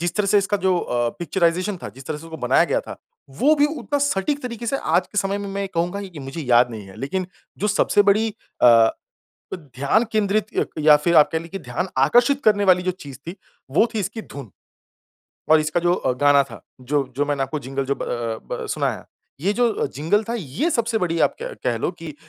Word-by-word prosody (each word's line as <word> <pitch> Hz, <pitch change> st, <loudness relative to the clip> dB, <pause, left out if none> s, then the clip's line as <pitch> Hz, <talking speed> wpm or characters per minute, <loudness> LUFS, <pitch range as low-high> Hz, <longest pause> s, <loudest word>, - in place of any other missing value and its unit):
जिस 175 Hz, -, -1 dB
तरह 210 Hz, -1 st, +1 dB
से 205 Hz, +1 st, +4 dB
इसका 200 Hz, +1 st, 0 dB
जो 190 Hz, -1 st, +1 dB
अ, 120 Hz, -5 st, -1 dB
पिक्चराइजेशन 180 Hz, +3 st, 0 dB
था -, -, -5 dB
जिस 135 Hz, +1 st, -13 dB
तरह 155 Hz, -, -3 dB
से 165 Hz, -, -12 dB
उसको 165 Hz, -1 st, -8 dB
बनाया -, -, +4 dB
गया -, -, 0 dB
था -, -, -9 dB, 0.4 s
वो 300 Hz, +3 st, +5 dB
भी 290 Hz, -, +4 dB
उतना 285 Hz, +4 st, -2 dB
सटीक 285 Hz, +1 st, 0 dB
तरीके 235 Hz, -2 st, -6 dB
से 275 Hz, -, 0 dB
आज -, -, +1 dB
के 210 Hz, -, -3 dB
समय 195 Hz, 0 st, 0 dB
में 200 Hz, 0 st, -5 dB
मैं 195 Hz, 0 st, -4 dB
ये -, -, -2 dB
कहूँगा 175 Hz, +4 st, -1 dB
कि 180 Hz, -6 st, -9 dB
मुझे 135 Hz, +4 st, -6 dB
याद 125 Hz, -2 st, +4 dB
नहीं 110 Hz, -4 st, -8 dB
है। 95 Hz, -, -13 dB
लेकिन 185 Hz, +7 st, -3 dB, 0.3 s
जो 210 Hz, -, 0 dB
सबसे 205 Hz, 0 st, +3 dB
बड़ी 210 Hz, +3 st, +3 dB, 0.3 s
अ -, -, +8 dB
अ, 115 Hz, -2 st, +7 dB, 0.7 s
ध्यान 145 Hz, -, 0 dB
केंद्रित 215 Hz, -1 st, 0 dB
अ, -, -, +1 dB
या 150 Hz, 0 st, +7 dB
फिर 170 Hz, +3 st, +1 dB
आप 150 Hz, -1 st, +7 dB
कह 160 Hz, -, 0 dB
ले 165 Hz, -, -9 dB
कि 195 Hz, +3 st, -7 dB
ध्यान 135 Hz, +6 st, -3 dB
आकर्षित 240 Hz, -, +3 dB
करने 205 Hz, -2 st, +4 dB
वाली 180 Hz, -, +3 dB
जो 185 Hz, -, 0 dB
चीज़ 140 Hz, -2 st, -9 dB
थी 175 Hz, -, -5 dB, 0.4 s
वो 220 Hz, -, +4 dB
थी 220 Hz, -, -1 dB
इसकी 205 Hz, +3 st, -4 dB
धुन। 135 Hz, -, -10 dB, 1.0 s
और 160 Hz, 0 st, +7 dB
इसका 155 Hz, +3 st, -1 dB
जो 175 Hz, +1 st, +2 dB
अ, 130 Hz, -, -1 dB
गाना 140 Hz, +2 st, +4 dB
था 120 Hz, -4 st, -12 dB, 0.2 s
जो 140 Hz, +2 st, -1 dB
जो 145 Hz, -, +1 dB
मैंने 145 Hz, -2 st, -1 dB
आपको 135 Hz, +3 st, -3 dB
जिंगल 135 Hz, +1 st, -3 dB
जो 140 Hz, -, 0 dB
ब -, -, -7 dB
अ, 115 Hz, -2 st, -3 dB, 0.2 s
ब -, -, -5 dB
अ, -, -, -5 dB
सुनाया। -, -, -2 dB, 0.4 s
ये 195 Hz, +5 st, +1 dB
जो 235 Hz, -2 st, +1 dB
जिंगल 165 Hz, +10 st, +1 dB
था 235 Hz, -, -1 dB
ये 180 Hz, -, -2 dB
सबसे 235 Hz, -3 st, 0 dB
बड़ी 170 Hz, -4 st, -1 dB
आप -, -, +3 dB
कह -, -, -5 dB
कह -, -, +1 dB
लो -, -, -1 dB
कि -, -, -8 dB
175 Hz, 235 wpm, -22 LUFS, 140-210 Hz, 1.0 s, अ